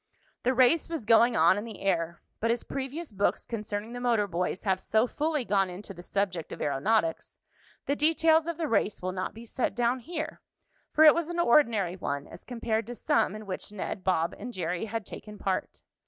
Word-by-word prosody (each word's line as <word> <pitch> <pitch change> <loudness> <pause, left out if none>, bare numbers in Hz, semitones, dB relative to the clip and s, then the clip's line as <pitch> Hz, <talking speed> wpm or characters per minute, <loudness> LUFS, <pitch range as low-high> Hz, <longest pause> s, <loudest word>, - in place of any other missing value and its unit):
The 255 +1 +1
race 260 +7 +4
was 325 -9 -4
going 230 +1 +5
on 170 +3 +5
in - - -5
the 225 -3 -9
air, 170 -3 -1 0.2
but 230 - 0
as 235 0 +1
previous 275 +3 -5
books 200 0 0
concerning 215 0 -4
the 245 - -5
motor 235 -4 +2
boys 180 0 -2
have 190 -3 +1
so 220 +4 +2
fully 300 +1 -1
gone 195 -2 +2
into 195 +3 -8
the 175 - -10
subject 180 -3 -2
of - - -7
aeronautics, 165 +4 0 0.5
the 280 - +1
details 320 +1 +3
of 335 -2 -3
the 325 -2 -1
race 210 -5 0
will 185 - -1
not 185 +2 -4
be 230 +1 -10
set 245 +2 -2
down 245 +1 +1
here, 315 +3 -5 0.5
for 310 - +5
it 305 - +10
was 340 -1 -2
an 345 - -4
ordinary 230 - +3
one 140 -5 -3
as - - -12
compared 230 -3 -2
to 245 - -6
some 285 -7 +1
in 215 0 -8
which 195 +1 -5
Ned, 195 -2 -5
Bob 175 -2 +1
and 245 +4 -6
Jerry 180 -1 -2
had 225 -1 -4
taken 210 +2 -9
part. 190 -2 -3
220 Hz, 205 wpm, -28 LUFS, 190-255 Hz, 0.5 s, it